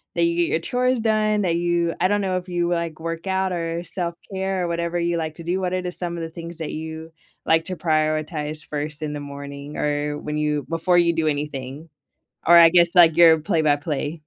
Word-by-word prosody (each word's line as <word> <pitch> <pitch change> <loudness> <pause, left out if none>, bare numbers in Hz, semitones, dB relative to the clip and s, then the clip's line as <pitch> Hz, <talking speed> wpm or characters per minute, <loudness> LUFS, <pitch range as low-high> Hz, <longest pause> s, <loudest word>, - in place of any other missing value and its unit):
that 170 - +2
you 170 0 +2
get 170 - +2
your 160 - +1
chores 250 +7 0
done? 215 -1 +1
That 175 -4 +1
you 170 -1 0
I 185 - +3
don't 205 +1 +1
know 185 -2 0
if 180 - -6
you, 175 -1 -1
like, 170 -2 -2
work 165 +2 -5
out, 190 0 0
or 170 -1 -3
self-care, 190 +2 -4
or 175 - -1
whatever 170 0 -2
you 170 0 0
like 160 -1 -3
to 170 - -10
do, 180 +3 -1
what 180 -1 -2
are 185 - 0
the 180 - -4
some 175 -1 -4
of 165 - -4
the 165 - -5
things 170 0 -9
that 160 - -4
you 160 +1 -7 0.3
like 160 0 +3
to 185 - -4
prioritize 155 -1 -1
1st 150 +1 -4
in 150 -1 -3
the 145 - -4
morning, 140 0 -8
or 145 0 -1
when 150 0 -4
you 150 -1 -1
before 165 +2 +2
you 170 -1 +4
do 160 -1 0
anything? 145 0 -4 0.6
Or 170 +1 +8
I 165 -1 +9
guess 175 +1 +4
like 165 -2 +6
your 165 -2 +7
play-by-play. 150 -2 0
165 Hz, 225 wpm, -22 LUFS, 155-175 Hz, 0.6 s, I